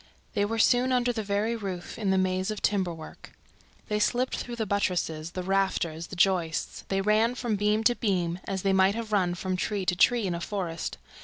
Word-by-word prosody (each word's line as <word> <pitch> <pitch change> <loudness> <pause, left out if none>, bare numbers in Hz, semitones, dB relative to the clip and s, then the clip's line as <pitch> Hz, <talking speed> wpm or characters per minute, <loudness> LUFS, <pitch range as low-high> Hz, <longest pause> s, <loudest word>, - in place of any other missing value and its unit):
They 205 -2 +2
were 225 +2 -2
soon 245 +3 +4
under 245 -1 +2
the 225 - -2
very 210 +3 0
roof, 190 -5 -5
in 205 -3 0
the 190 - +3
maze 185 +1 0
of 215 -1 -3
timber 190 -3 +1
work. 160 -1 -11 0.5
They 210 -1 0
slipped 245 +5 +1
through 240 - -5
the 225 -2 -2
buttresses, 175 -5 -1
the 185 - -3
rafters, 180 -4 0
the - - -8
joists; 175 -3 0
they 195 0 0
ran 215 +4 +3
from 240 -4 -1
beam 210 +2 +1
to 240 - +5
beam 180 -6 -1
as 190 -1 -3
they 195 -1 +2
might 190 +1 +4
have 230 -2 -5
run 180 -4 +2
from 185 +1 -2
tree 195 +1 -2
to 180 - +2
tree 235 +4 +4
in 180 - -1
a 170 - -4
forest. 175 -5 -3
195 Hz, 215 wpm, -27 LUFS, 180-220 Hz, 0.5 s, to